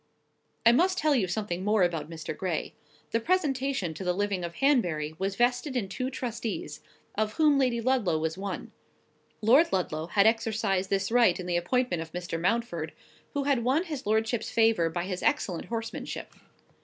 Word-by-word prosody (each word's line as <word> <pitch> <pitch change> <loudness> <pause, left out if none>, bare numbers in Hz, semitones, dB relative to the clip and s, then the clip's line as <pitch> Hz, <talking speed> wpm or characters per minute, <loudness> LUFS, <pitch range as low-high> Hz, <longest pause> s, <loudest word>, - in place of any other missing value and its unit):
I 230 - +9
must 365 +9 +3
tell 310 -4 +3
you 225 -9 +2
something 185 -1 -3
more 210 -1 +3
about 165 -3 -1
Mr. 160 -1 -6
Gray. 185 -6 -3 0.4
The 230 - +2
presentation 270 - 0
to 155 - -7
the 180 -1 +1
living 200 -2 -1
of 170 0 -5
Hanbury 175 - +1
was 195 +1 -1
vested 245 +4 +1
in 225 -6 0
two 255 +7 -3
trustees, 235 -3 -4 0.3
of 215 0 -1
whom 300 -3 +4
Lady 250 -3 +2
Ludlow 230 -9 +2
was 160 +1 -2
one: 195 0 -5 0.7
Lord 260 +10 +5
Ludlow 165 -4 -1
had 200 +3 +3
exercised 220 -4 +1
this 195 +1 0
right 235 -7 +4
in 180 - -5
the 175 -1 -1
appointment 175 +1 0
of 165 0 -8
Mr. 175 -2 -4
Mountford, 175 -6 -1 0.4
who 285 - +1
had 270 -4 +1
won 270 +8 +2
his 300 - -6
lordship's 220 +1 0
favour 225 -7 +3
by 175 +1 -3
his 185 -1 -4
excellent 205 - 0
horsemanship. 225 -1 -5
215 Hz, 175 wpm, -28 LUFS, 180-250 Hz, 0.7 s, I